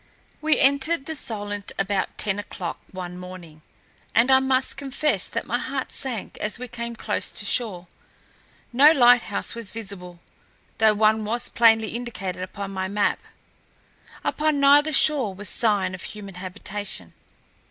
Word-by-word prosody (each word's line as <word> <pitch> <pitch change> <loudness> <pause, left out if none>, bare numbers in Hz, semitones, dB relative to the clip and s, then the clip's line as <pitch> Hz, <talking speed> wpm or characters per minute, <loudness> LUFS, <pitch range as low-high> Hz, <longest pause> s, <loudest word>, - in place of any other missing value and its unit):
We 310 0 +3
entered 280 +3 +3
the 320 - -4
Solent 205 -7 -4
about 195 0 -1
ten 205 -1 0
o'clock 185 -4 -6
one 180 -1 -7
morning, 180 -4 -11 0.5
and 240 +3 +4
I 265 - +7
must 265 0 +1
confess 275 -5 -1
that - - -4
my 245 - -1
heart 265 0 -4
sank 245 -6 -3
as 210 - -1
we 250 +1 -7
came 235 0 -6
close 215 -2 -2
to 205 - -5
shore. 200 -5 0 0.9
No 285 +5 +8
lighthouse 245 -6 +3
was 230 -4 -1
visible, 195 -5 -8 0.6
though 215 -1 +5
one 215 +1 +3
was 235 +3 -2
plainly 225 -2 +4
indicated 225 -7 -5
upon 195 +2 -6
my 190 -1 -3
map. 205 +1 0 1.0
Upon 305 -1 0
neither 290 +2 +5
shore 275 -8 +3
was 205 +2 -4
sign 205 -5 +2
of 185 - -7
human 200 -2 -8
habitation. 185 - -7
215 Hz, 145 wpm, -24 LUFS, 195-255 Hz, 1.0 s, No